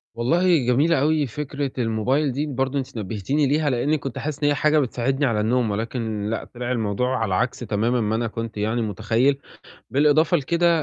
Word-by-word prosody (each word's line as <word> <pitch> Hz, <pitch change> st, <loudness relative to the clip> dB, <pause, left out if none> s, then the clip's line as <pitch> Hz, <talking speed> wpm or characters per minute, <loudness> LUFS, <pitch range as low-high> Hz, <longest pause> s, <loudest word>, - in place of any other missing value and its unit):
والله 170 Hz, +9 st, +3 dB
جميلة 140 Hz, +5 st, +3 dB
أوي 155 Hz, 0 st, +2 dB
فكرة 140 Hz, +1 st, -4 dB
الموبايل 125 Hz, +5 st, +1 dB
دي، 140 Hz, +4 st, -2 dB
برضه 135 Hz, -1 st, -1 dB
أنتِ 125 Hz, -3 st, -6 dB
نبّهتيني 110 Hz, +8 st, -1 dB
ليها، 150 Hz, +1 st, +1 dB
لإنّي 140 Hz, +5 st, +1 dB
كنت 135 Hz, -2 st, -6 dB
حاسس 150 Hz, 0 st, -4 dB
إن 145 Hz, -, +4 dB
هي 145 Hz, -, +2 dB
حاجة 155 Hz, +3 st, +3 dB
بتساعدني 135 Hz, +1 st, 0 dB
على 110 Hz, -4 st, +1 dB
النوم 115 Hz, 0 st, +1 dB
ولكن 110 Hz, -1 st, -3 dB
لأ، 115 Hz, -, -2 dB
طلع 120 Hz, +1 st, -4 dB
الموضوع 125 Hz, +3 st, 0 dB
على 105 Hz, -5 st, 0 dB
عكس 125 Hz, +4 st, -1 dB
تمامًا 115 Hz, +2 st, 0 dB
ما 110 Hz, 0 st, 0 dB
أنا 115 Hz, +1 st, -1 dB
كنت 115 Hz, 0 st, -6 dB
يعني 110 Hz, +3 st, 0 dB
متخيّل، 115 Hz, +6 st, +1 dB, 0.5 s
بالإضافة 150 Hz, +6 st, +4 dB
لكده 170 Hz, +4 st, +1 dB
125 Hz, 185 wpm, -23 LUFS, 115-145 Hz, 0.5 s, إن